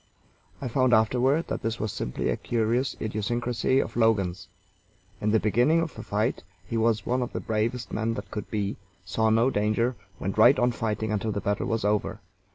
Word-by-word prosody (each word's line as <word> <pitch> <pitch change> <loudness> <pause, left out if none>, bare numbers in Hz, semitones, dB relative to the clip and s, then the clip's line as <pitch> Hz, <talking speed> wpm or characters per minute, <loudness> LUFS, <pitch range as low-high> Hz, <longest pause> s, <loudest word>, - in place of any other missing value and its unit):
I 135 - -4
found 125 0 +3
afterward 125 +8 +2
that - - -2
this 115 0 -2
was 110 -1 -2
simply - - -2
a - - +1
curious 120 +3 0
idiosyncrasy 120 +4 0
of 115 - -2
Logan's. 100 -5 +1 0.7
In 105 - +1
the 110 +1 +4
beginning 120 +10 +3
of 165 -3 -2
a - - -7
fight - - -1 0.2
he - - -5
was 115 -1 +1
one 125 +1 0
of 125 - -3
the - - -2
bravest 115 +2 -2
men 115 +1 -1
that 100 -2 -7
could 105 - -5
be, 100 -2 -2 0.3
saw 110 +4 +1
no 115 +4 +3
danger, 110 +4 +1 0.2
went - - -3
right - - +7
on 125 0 +3
fighting 110 -1 -2
until 110 +1 -1
the 100 - -2
battle 100 +1 -1
was 115 -2 -1
over. 105 0 0
115 Hz, 190 wpm, -27 LUFS, 105-120 Hz, 0.7 s, right